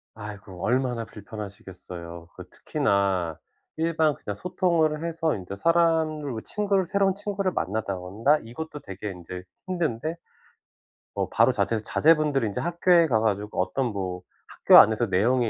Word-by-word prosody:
아이고 100 -4 -9
얼마나 125 -1 0
불편하시겠어요. 95 -6 -9
그 - - -11
특히나 95 -5 0 0.4
일반 160 -2 +1
그냥 105 - -6
소통을 170 - 0
해서 165 -1 -1
인제 95 0 -7
사람을 160 -3 +1
친구를 200 -2 0
새로운 195 +1 +1
친구를 200 -2 -2
만나다 100 0 -2
온다 105 +12 +1
이것도 150 +7 -7
되게 100 -3 -7
인제 90 0 -8 0.2
힘든데 165 -4 -2 1.0
어 - - -1
바로 - - +4
자퇴해서 110 -2 -1
자제분들이 150 -5 +3
인제 100 - -3
학교에 175 0 +3
가 115 -7 +2
가지고 105 -2 -1
어떤 125 +7 -1
뭐 95 -3 -4 0.3
학교 - - +5
안에서 110 +2 +5
내용이 115 +5 +2
115 Hz, 335 characters per minute, -26 LUFS, 100-165 Hz, 1.0 s, 학교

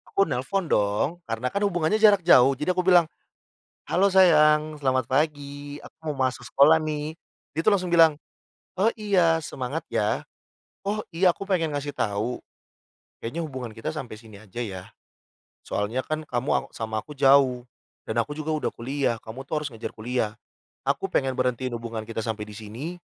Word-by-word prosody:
Aku 195 - +5
nelepon, 155 +8 -1
dong. 105 +5 +2 0.2
Karena 115 +2 -2
kan 200 - -2
hubungannya 175 +2 +1
jarak 205 -4 +6
jauh, 135 -3 +6
jadi 150 +7 -1
aku 180 0 0
bilang, 180 -2 +6 0.8
"Halo 190 +3 +3
sayang, 155 -5 +4
selamat 130 -2 +1
pagi. 145 0 -2
Aku - - -14 0.2
mau 135 -2 0
masuk 125 -1 -4
sekolah 155 +4 +5
nih." 155 0 -3 0.4
Dia 155 - -2
tuh 215 - +5
langsung 180 -3 -1
bilang, 165 -3 +6 0.6
"Oh, 200 +4 +4
iya, 180 -7 +2
semangat 140 +1 -4
ya. 105 0 0 0.6
Oh, 210 +2 -1
iya, 180 +1 +3
aku 195 +3 -9
pengen 170 -5 +1
ngasih 145 0 -4
tahu, 105 +4 -2 0.8
kayaknya 135 +9 -5
hubungan 130 -7 -6
kita 115 +5 -6
sampai 130 -9 -6
sini 110 -3 -14
aja, 110 +3 -9
ya? 95 -6 -4 0.8
Soalnya 110 +6 -2
kan 155 0 -4
kamu 125 +2 -2
aw - - +2
sama 110 -1 -3
aku 150 +7 -10
jauh. 135 -2 +4 0.4
Dan 110 +1 -2
aku 145 +6 -2
juga 155 +1 -3
udah 155 -1 -1
kuliah, 130 0 -1
kamu 130 +5 -9
tuh 150 0 -2
harus 140 - -5
ngejar 115 -1 -7
kuliah. 115 -1 -2 0.5
Aku 145 +8 0
pengen 135 -6 +1
berhentiin 125 0 -1
hubungan 115 -2 -5
kita 115 0 -4
sampai 110 -1 -4
di 105 - -11
sini, 115 +11 -7
140 Hz, 170 wpm, -25 LUFS, 120-160 Hz, 0.8 s, jarak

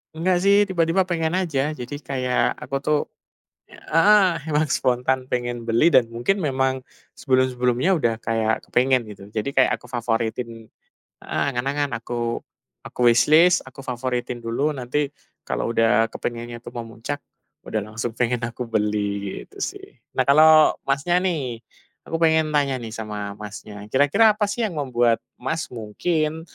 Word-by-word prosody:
Enggak 180 +3 +1
sih 200 +1 +5
tiba-tiba 185 -1 +1
pengen 170 -2 -1
aja. 155 -5 -1
Jadi 145 +2 -6
kayak 130 -3 0
aku 135 - -4
tuh 150 +2 +1 0.7
heeh, 185 +1 +3
emang 155 0 +1
spontan 130 0 +1
pengen 120 -2 -3
beli 115 +7 +3
dan 125 - +6
mungkin 120 +12 0
memang 130 -4 0 0.3
sebelum-sebelumnya 130 +5 +1
udah 120 -7 +1
kayak 110 -1 0
kepengen, 125 -2 +2
gitu. 100 -1 -10
Jadi 110 +3 -2
kayak 130 - +3
aku 125 - -15
favoritin 115 -1 -3 0.5
heeh, - - -3
angan-angan, 140 +3 -1
aku 120 0 -3 0.4
aku - - -13
wishlist, 155 +9 +5
aku 135 +1 -12
favoritin 125 -1 -3
dulu, 120 +7 -1
nanti 140 +2 -2 0.3
kalau - - -2
udah 115 -1 +3
kepengennya 120 0 -5
itu 120 - -9
memuncak, 115 +4 -6 0.4
udah 110 - -2
langsung 115 +2 -2
pengen 125 -1 0
aku 120 +1 -4
beli, 105 -2 -1
gitu - - -18
sih. - - -4 0.3
Nah, - - +3
kalau 155 +2 +7
Masnya 140 +6 +1
nih, 140 -11 -2 0.4
aku 165 - -2
pengen 160 -1 +3
tanya 140 -3 +1
nih 115 - -6
sama 105 -2 -5
Masnya, 105 0 -9
kira-kira 145 - +4
apa 210 0 0
sih 220 +4 -2
yang 180 -7 -5
membuat, 120 -4 +1 0.2
Mas, 160 +6 -3
mungkin 155 +8 -2
130 Hz, 145 wpm, -23 LUFS, 115-155 Hz, 0.7 s, kalau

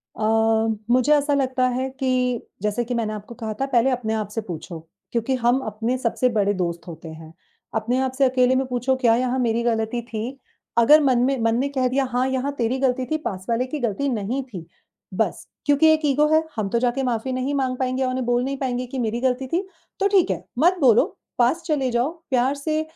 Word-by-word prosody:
अ, 215 - -4 0.7
मुझे 255 +4 +4
ऐसा 290 0 +2
लगता 260 -2 +1
है 260 +2 -2
कि 255 -2 +1 0.2
जैसे 210 +3 0
कि 245 - -3
मैंने 220 -2 -1
आपको 210 +3 -8
कहा 220 -3 -4
था - - +2
पहले 260 -1 +2
अपने 235 -3 -1
आप 215 -2 -2
से 225 +2 -3
पूछो, 175 -3 -7 0.3
क्योंकि 240 +3 0
हम 245 +1 +2
अपने 225 +4 -2
सबसे 250 +1 +1
बड़े 205 -3 +1
दोस्त 170 -2 -3
होते 165 0 -9
हैं। 160 0 -11 0.4
अपने 230 +4 0
आप 260 -1 0
से 275 - +4
अकेले 255 0 +3
में 265 - +1
पूछो 250 +1 0
क्या 240 -3 +3
यहाँ 255 +1 0
मेरी 235 -1 +1
गलती 230 0 0
थी, 235 +3 -6 0.4
अगर 295 +7 +7
मन 255 -3 +3
में 270 0 +1
मन 225 0 +2
ने 275 - +1
कह 260 -2 0
दिया 270 +2 +1
हाँ 250 +1 +1
यहाँ 265 +2 -1
तेरी 240 +2 0
गलती 260 -1 +1
थी 310 - +2
पास 185 -2 -4
वाले 235 +2 +1
की 295 +3 -4
गलती 245 +3 -1
नहीं 240 +4 -2
थी। 190 -10 -9 0.5
बस, - - -2 0.2
क्योंकि 290 +2 +4
एक 310 - 0
ईगो 295 +2 +3
है, 315 +1 +4
हम 210 -3 -2
तो 235 - +1
जाके 250 +2 0
माफी 250 0 -1
नहीं 255 +2 -1
माँग 260 -2 -1
पाएँगे 260 0 0
और 255 - 0
उन्हें 255 -1 -2
बोल 245 +1 +1
नहीं 275 +1 -3
पाएँगे 255 -2 -2
कि 260 +1 -5
मेरी 235 +1 -1
गलती 260 0 0
थी, 345 +7 0 0.4
तो 395 - +3
ठीक 385 -3 +3
है। - - -3 0.2
मत 355 +3 +4
बोलो, 240 -4 +6 0.3
पास 255 +8 +2
चले 290 -6 0
जाओ, 240 +4 +1 0.2
प्यार 260 +1 +2
से 310 +2 -1
250 Hz, 220 wpm, -23 LUFS, 230-265 Hz, 0.7 s, अगर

